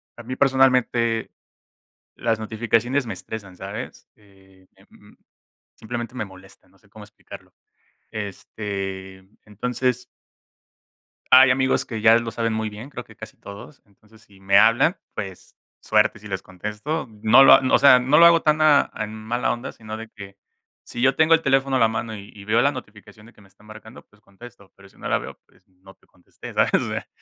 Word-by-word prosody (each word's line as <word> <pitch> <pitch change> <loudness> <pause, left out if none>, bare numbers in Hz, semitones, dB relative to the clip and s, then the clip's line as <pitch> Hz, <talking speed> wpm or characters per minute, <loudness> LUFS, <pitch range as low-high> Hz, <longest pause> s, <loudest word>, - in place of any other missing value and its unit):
a 120 - -11
mí 130 +2 -6
personalmente 125 -4 +2 0.9
las 115 -2 -1
notificaciones 115 +4 -1
me 110 - -5
estresan, 95 0 -9
¿sabes? 100 +7 -8
eh, 95 -2 -24
m - - -22 0.6
simplemente 120 +2 -7
me 125 - -3
molestan, 95 -1 -16
no 95 - -27
sé 100 - -28
cómo 105 +1 -14
explicarlo, 105 +1 -14 0.6
este, 95 -2 -7 0.2
entonces 125 +4 -3 1.3
hay 130 0 +8
amigos 130 0 +1
que 115 -5 -6
ya 110 +1 +6
lo 115 -1 -4
saben 115 -1 -2
muy 110 0 -3
bien, 105 +6 -10
creo - - -8
que - - -18
casi - - -12
todos, 100 +8 -12
entonces 105 +2 -24
si 100 -2 -22
me 100 0 +3
hablan 115 - +4 0.2
pues 95 -2 -8 0.3
suerte 110 +1 +1
si 105 - -12
les 95 -2 -4
contesto, 105 - -5
no 110 +5 +6
lo - - +8
o - - +6
sea, 130 -3 +7
no 135 +4 +2
lo 170 - +8
hago 170 -1 +6
tan 155 0 +1
a 150 -2 +4
en 110 -1 -5
mala 110 +3 -2
onda 120 +1 -7
sino 110 -1 -9
de 115 0 -10
que 100 -2 -13 0.5
si 120 - -8
yo 135 +1 +3
tengo 160 +1 +5
el 165 - -2
teléfono 135 0 +1
a - - 0
la 115 - +4
mano 110 0 -5
y 100 -1 -12
y 100 - -12
veo 115 +3 +2
la 140 - +2
notificación 105 -4 -12
de 115 - -18
que - - -22
me 100 - -20
está 100 - -26
marcando 110 +2 -14
pues 105 0 -28
contesto, 100 0 -16
pero 100 0 -18
si - - -26
no - - -7
la - - +1
veo - - -10
pues - - -30
no 95 +1 -19
te - - -32
contesté, 90 - -14
¿sabes? - - +1
o - - 0
sea, - - -5
110 Hz, 190 wpm, -22 LUFS, 100-125 Hz, 1.3 s, hay